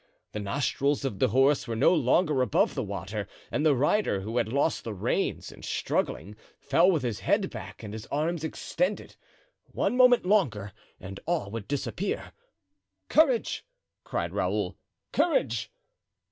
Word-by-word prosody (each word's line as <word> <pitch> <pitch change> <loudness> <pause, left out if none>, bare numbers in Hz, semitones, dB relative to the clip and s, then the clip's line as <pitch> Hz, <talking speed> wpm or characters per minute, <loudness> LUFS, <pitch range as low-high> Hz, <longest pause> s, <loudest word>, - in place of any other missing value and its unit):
The 105 - -4
nostrils 140 +7 0
of 105 -8 -3
the - - +4
horse 135 +5 +3
were 115 - -2
no 110 - +4
longer 150 -1 +3
above 125 -6 +2
water, 100 +3 -4 0.2
and 150 - 0
the 155 -3 +4
rider, 145 - +1
who 110 +5 -4
had 110 - 0
lost 140 +4 +1
the 110 -3 -5
reins 90 - -1
in - - -14
struggling, 105 +2 -2 0.2
fell 165 +7 +4
with 165 -7 +1
his 120 -4 -2
head - - +1
back - - -9
and 105 -1 -7
his 110 0 -7
arms 160 +2 -1
extended. 180 +4 -2 0.5
One - - -1
moment 250 -4 +6
longer 120 - +1 0.3
and 95 +1 -8
all 165 - -1
would 110 -3 -5
disappear. 145 +7 -3 0.8
"Courage!" 275 -7 +3 0.4
cried - - -3
Raoul, - - -1 0.4
"courage!" 355 +8 +1
140 Hz, 145 wpm, -28 LUFS, 110-175 Hz, 0.8 s, moment